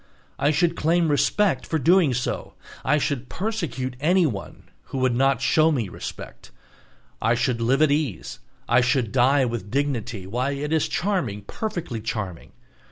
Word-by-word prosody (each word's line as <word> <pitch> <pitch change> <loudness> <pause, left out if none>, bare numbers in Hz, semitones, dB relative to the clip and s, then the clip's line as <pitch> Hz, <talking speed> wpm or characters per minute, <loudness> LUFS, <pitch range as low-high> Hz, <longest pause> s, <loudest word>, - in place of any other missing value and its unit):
I 145 - +3
should 170 +2 +2
claim 165 +1 +2
respect 195 +7 +2
for 160 - -1
doing 165 +1 +4
so. 120 - -3 0.3
I 150 - +3
should 140 -3 -2
persecute 170 - -3
anyone 155 - 0 0.2
who - - -6
would 130 -1 +2
not 135 0 +2
show 155 +3 +4
me 120 -10 -1
respect. - - -8 0.7
I 115 +2 +3
should 120 -1 0
live 135 +6 +3
at 155 - +3
ease, 145 - -2 0.3
I 120 +1 +4
should 125 -3 +1
die 130 +2 +4
with 115 -5 -4
dignity, 125 -6 -2
why, 125 +8 -1
it 150 +2 -3
is 160 - +2
charming, 150 - -1
perfectly 170 - -4
charming! 105 -6 -5
135 Hz, 155 wpm, -24 LUFS, 120-160 Hz, 0.7 s, doing